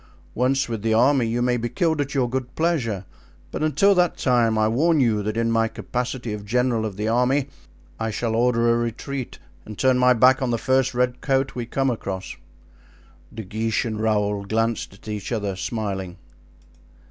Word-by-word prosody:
Once 135 Hz, +2 st, +1 dB
with 115 Hz, -3 st, -4 dB
the 110 Hz, 0 st, +1 dB
army 125 Hz, +1 st, +4 dB
you 120 Hz, +2 st, 0 dB
may 125 Hz, 0 st, +2 dB
be 120 Hz, 0 st, -3 dB
killed 160 Hz, -3 st, 0 dB
at 140 Hz, 0 st, -4 dB
your 130 Hz, -3 st, +2 dB
good 130 Hz, 0 st, -4 dB
pleasure; 125 Hz, -, -1 dB, 0.5 s
but -, -, -4 dB
until 155 Hz, +7 st, +4 dB
that 180 Hz, -2 st, +2 dB
time, 120 Hz, -4 st, +2 dB
I 110 Hz, 0 st, +3 dB
warn 155 Hz, +8 st, +2 dB
you 115 Hz, -5 st, +2 dB
that 105 Hz, +2 st, -3 dB
in 115 Hz, 0 st, +1 dB
my 115 Hz, 0 st, +2 dB
capacity 125 Hz, 0 st, -4 dB
of 105 Hz, -1 st, -6 dB
general 120 Hz, 0 st, 0 dB
of 100 Hz, -3 st, -8 dB
the 105 Hz, +1 st, -2 dB
army 125 Hz, +4 st, +1 dB, 0.5 s
I 110 Hz, 0 st, -1 dB
shall 110 Hz, +1 st, -2 dB
order 115 Hz, 0 st, +3 dB
a -, -, +1 dB
retreat 120 Hz, +3 st, -4 dB, 0.3 s
and 105 Hz, -1 st, -10 dB
turn 130 Hz, -1 st, +3 dB
my 125 Hz, 0 st, +5 dB
back 130 Hz, +3 st, +4 dB
on 130 Hz, -, 0 dB
the 120 Hz, -, +1 dB
first 130 Hz, +1 st, +1 dB
red 125 Hz, 0 st, 0 dB
coat 135 Hz, -1 st, 0 dB
we 120 Hz, -2 st, -5 dB
come 135 Hz, +1 st, 0 dB
across." 95 Hz, -5 st, -5 dB, 1.0 s
De 110 Hz, -, -7 dB
Guiche 110 Hz, +3 st, -1 dB
and 110 Hz, -2 st, -3 dB
Raoul 105 Hz, -2 st, 0 dB
glanced 115 Hz, +2 st, -1 dB
at 100 Hz, -, -18 dB
each 105 Hz, 0 st, -5 dB
other, 105 Hz, -4 st, -2 dB
smiling. 95 Hz, -3 st, -4 dB
120 Hz, 190 wpm, -23 LUFS, 110-130 Hz, 1.0 s, my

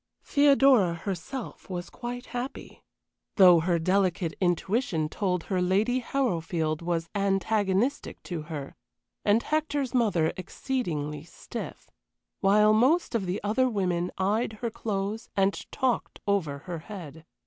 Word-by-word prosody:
Theodora 270 Hz, -10 st, +5 dB
herself 195 Hz, +10 st, -6 dB
was 175 Hz, -1 st, -5 dB
quite 245 Hz, +1 st, -6 dB
happy, 245 Hz, +2 st, -6 dB, 0.5 s
though 180 Hz, -4 st, +8 dB
her 170 Hz, +1 st, +1 dB
delicate 185 Hz, -1 st, +1 dB
intuition 175 Hz, -2 st, 0 dB
told 180 Hz, -2 st, -1 dB
her 185 Hz, -2 st, -1 dB
Lady 205 Hz, +8 st, +2 dB
Harrowfield 170 Hz, -, -1 dB
was 170 Hz, -1 st, -1 dB
antagonistic 200 Hz, +4 st, 0 dB
to 170 Hz, -3 st, -4 dB
her, 145 Hz, -4 st, -6 dB, 0.5 s
and 210 Hz, +3 st, +3 dB
Hector's 295 Hz, -4 st, -1 dB
mother 205 Hz, -10 st, +2 dB
exceedingly 155 Hz, -, -3 dB
stiff, 165 Hz, -, -8 dB, 0.5 s
while 210 Hz, +2 st, +5 dB
most 265 Hz, +11 st, +3 dB
of 210 Hz, -5 st, -1 dB
the 180 Hz, +3 st, -1 dB
other 255 Hz, +5 st, +2 dB
women 180 Hz, -5 st, 0 dB
eyed 215 Hz, +4 st, 0 dB
her 230 Hz, +2 st, -4 dB
clothes 210 Hz, 0 st, -3 dB
and 195 Hz, 0 st, 0 dB
talked 255 Hz, -3 st, -1 dB
over 175 Hz, -9 st, 0 dB
her 175 Hz, -3 st, -4 dB
head. 160 Hz, -4 st, -9 dB
195 Hz, 125 wpm, -27 LUFS, 175-235 Hz, 0.5 s, though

